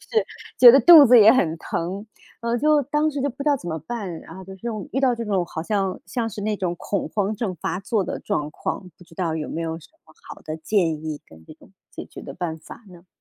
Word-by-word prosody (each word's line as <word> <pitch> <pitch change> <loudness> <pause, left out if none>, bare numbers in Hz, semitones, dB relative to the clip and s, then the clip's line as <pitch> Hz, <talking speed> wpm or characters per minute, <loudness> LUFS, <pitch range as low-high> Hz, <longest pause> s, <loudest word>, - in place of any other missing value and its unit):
就 - - -21
是 450 - +2 0.3
觉 245 - +11
得 270 - +6
肚 320 -3 +9
子 245 0 +7
也 220 0 +8
很 165 -11 +1
疼， 185 +5 -5 0.4
然 235 0 -2
后 240 - +1
就 300 +2 +3
当 300 +3 0
时 285 -2 -4
就 285 - 0
不 270 +3 -8
知 300 - 0
道 290 - +3
怎 210 - -11
么 160 - -3
办。 200 -9 -5
然 165 - -12
后 190 - -10
就 190 +1 -10
是 210 +5 -7 0.2
遇 270 - 0
到 255 -3 +3
这 230 - -5
种 195 -5 -1
好 160 - -6
像 195 0 -1
像 225 +5 -3
是 210 -1 -7
那 215 +1 -1
种 175 -2 -2
恐 200 0 -3
慌 205 +4 -1
症 200 -4 -4
发 180 - -4
作 205 0 -1
的 - - -5
状 150 0 -3
况。 180 +4 -5
不 180 - -16
知 165 - -19
道 165 -2 -2
有 155 -1 -4
没 165 - -4
有 165 0 -4
什 155 - -17 0.2
么 160 - -21 0.2
好 - - -10
的 155 0 -6
建 165 -3 0
议 155 -2 -5
跟 80 0 -17
这 - - -12
种 - - -21 0.2
解 - - -8
决 - - -12
的 - - -9
办 170 -3 -4
法 160 - -13
呢？ 175 0 -16
195 Hz, 290 characters per minute, -22 LUFS, 165-240 Hz, 0.4 s, 觉